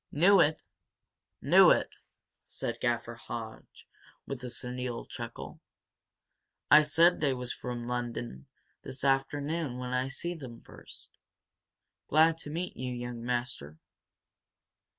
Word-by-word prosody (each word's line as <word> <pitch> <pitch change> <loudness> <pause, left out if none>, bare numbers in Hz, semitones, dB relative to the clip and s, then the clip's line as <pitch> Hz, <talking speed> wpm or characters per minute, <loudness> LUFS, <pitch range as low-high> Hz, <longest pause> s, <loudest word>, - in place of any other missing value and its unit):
"Knew 185 +7 +5
it! 155 -1 +4 0.9
Knew - - +7
it!" - - +3 0.6
said 115 0 -4
Gaffer 120 -1 -1
Hodge, 115 -1 -9 0.4
with 135 -2 -6
a 125 - -4
senile 125 0 -4
chuckle. - - -8 1.1
"I 150 +1 +10
said 165 +4 +4
they 140 -3 +1
was 125 -1 -4
from 120 -1 -5
Lunnon 120 - -4 0.3
this 130 - -5
afternoon 140 +1 0
when 125 0 -4
I 130 +1 +1
seen 170 +5 -3
them 120 -5 -9
fust! - - -12 0.9
Glad 160 +2 +4
to 150 - -6
meet 170 +4 -4
you, 130 0 -4
young 120 -1 -5
master." 120 - -3
125 Hz, 120 wpm, -30 LUFS, 120-150 Hz, 1.1 s, I